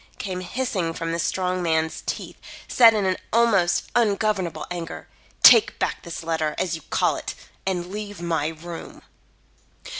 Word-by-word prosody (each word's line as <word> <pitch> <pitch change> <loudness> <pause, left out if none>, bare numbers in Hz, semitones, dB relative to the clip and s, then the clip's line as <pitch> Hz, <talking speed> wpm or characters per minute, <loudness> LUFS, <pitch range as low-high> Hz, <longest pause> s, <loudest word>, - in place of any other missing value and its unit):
came 185 -2 -4
hissing 185 -4 -2
from 165 0 -3
the 165 - -2
strong 185 +1 -1
man's 160 -1 0
teeth, - - -4 0.3
set 230 -3 +6
in 190 -3 +1 0.2
almost 215 -7 +3
ungovernable 205 -7 +1
anger. 170 -2 -6 0.4
"Take 435 - +8
back - - -2
this 170 -1 -7
letter, 160 -2 -1
as 175 - -1
you 160 - -8
call - - +1
it, - - -6 0.3
and 180 -2 -1
leave 205 -2 -6
my 165 -3 -1
room." 165 +1 -8
180 Hz, 145 wpm, -24 LUFS, 165-205 Hz, 0.4 s, Take